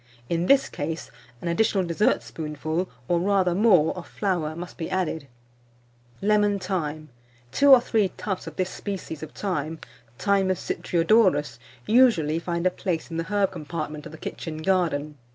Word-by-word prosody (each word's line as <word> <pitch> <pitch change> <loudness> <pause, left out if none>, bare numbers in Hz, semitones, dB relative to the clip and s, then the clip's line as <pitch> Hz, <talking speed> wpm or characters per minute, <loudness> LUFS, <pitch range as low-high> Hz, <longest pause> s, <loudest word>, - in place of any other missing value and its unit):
In 170 +1 0
this 275 0 +5
case, 160 +2 -5 0.3
an - - -3
additional 195 +2 +2
dessertspoonful, 160 -2 -1 0.2
or 175 - +2
rather 190 -1 +2
more, 185 -6 +4
of 180 - -8
flour 175 -6 -2
must 175 +2 -7
be 165 -1 -5
added. 170 -6 -2 1.0
[Illustration: - - -1
LEMON 205 -1 +2
THYME.] 185 -1 -1
LEMON 150 0 -4
THYME. 155 - -16 0.4
Two 285 - +4
or 265 -2 +10
three 215 -5 +1
tufts 190 -3 -4
of - - -7
this 185 0 -1
species 190 -6 -6
of 155 - -6
thyme, 165 -5 -3 0.4
Thymus 195 +1 +1
citriodorus, 165 - +2 0.3
usually 210 -11 +4
find 170 0 -3
a 185 - +4
place 175 -3 -3
in 165 - -3
the 165 - -2
herb 200 0 +1
compartment 155 -2 -5
of - - -12
the 160 - -10
kitchen 155 0 -6
garden. 155 -6 0
175 Hz, 165 wpm, -25 LUFS, 155-195 Hz, 1.0 s, or